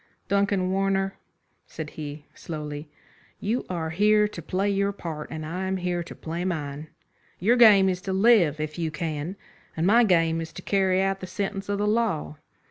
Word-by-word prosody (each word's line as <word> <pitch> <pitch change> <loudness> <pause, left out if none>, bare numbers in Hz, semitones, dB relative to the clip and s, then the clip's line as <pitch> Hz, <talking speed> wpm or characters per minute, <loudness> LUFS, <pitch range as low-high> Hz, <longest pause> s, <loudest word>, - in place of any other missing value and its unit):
"Duncan 200 -2 +1
Warner," 195 0 +1 0.5
said 155 -1 -7
he, 150 -1 -7
slowly, 150 -2 -6 0.5
"you 225 +5 -2
are 165 -3 -3
here 210 +4 +4
to 175 - -8
play 190 +5 -1
your 200 0 +1
part, 160 -6 -6
and 155 0 -5
I 180 +4 -3
am 190 0 -1
here 180 -1 -1
to 170 - -9
play 170 +2 -4
mine. 150 -4 -3 0.5
Your 225 +7 +3
game 210 -5 +7
is 180 -1 -1
to - - +1
live 190 -7 +4
if 155 +2 -4
you 165 -1 0
can, 155 +2 -4 0.4
and 160 - +1
my 230 +5 +6
game 165 -5 +3
is 165 - -6
to 185 - -9
carry 190 -1 +2
out 195 0 0
the 185 - -7
sentence 195 +1 -4
of 200 - 0
the 205 - 0
law. 210 -9 0
185 Hz, 185 wpm, -26 LUFS, 160-200 Hz, 0.5 s, game